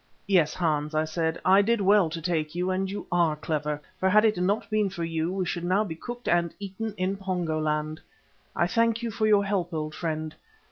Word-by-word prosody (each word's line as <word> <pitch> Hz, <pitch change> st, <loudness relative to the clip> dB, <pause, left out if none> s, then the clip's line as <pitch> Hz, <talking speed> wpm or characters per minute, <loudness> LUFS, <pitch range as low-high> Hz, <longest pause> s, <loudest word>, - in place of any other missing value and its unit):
"Yes, 175 Hz, -6 st, +3 dB
Hans," 155 Hz, -3 st, 0 dB
I 155 Hz, 0 st, +2 dB
said, 160 Hz, 0 st, -2 dB
"I 190 Hz, +2 st, +6 dB
did 230 Hz, +3 st, +1 dB
well 200 Hz, -3 st, +4 dB
to 165 Hz, +1 st, -5 dB
take 160 Hz, -2 st, -1 dB
you 180 Hz, +1 st, 0 dB
and 190 Hz, +1 st, -1 dB
you 205 Hz, +1 st, -5 dB
are 170 Hz, -3 st, +3 dB
clever, 150 Hz, -1 st, -2 dB, 0.2 s
for 190 Hz, -, +2 dB
had 215 Hz, +3 st, +5 dB
it 215 Hz, -, +3 dB
not 190 Hz, +4 st, 0 dB
been 215 Hz, -2 st, +2 dB
for 175 Hz, -3 st, -5 dB
you, 165 Hz, +1 st, -1 dB
we 190 Hz, -1 st, -1 dB
should 170 Hz, 0 st, -3 dB
now 185 Hz, +4 st, +2 dB
be 185 Hz, -6 st, -5 dB
cooked 240 Hz, +9 st, -8 dB
and 170 Hz, -1 st, +1 dB
eaten 205 Hz, +2 st, -5 dB
in 185 Hz, +2 st, -1 dB
Pongo 180 Hz, -5 st, -2 dB
land. 155 Hz, 0 st, -2 dB, 0.5 s
I -, -, +2 dB
thank 230 Hz, +4 st, +1 dB
you 230 Hz, -, -2 dB
for 215 Hz, 0 st, 0 dB
your 205 Hz, -2 st, +4 dB
help, 190 Hz, -3 st, -1 dB
old 155 Hz, 0 st, -3 dB
friend. 155 Hz, -2 st, -3 dB
180 Hz, 220 wpm, -27 LUFS, 160-200 Hz, 0.5 s, I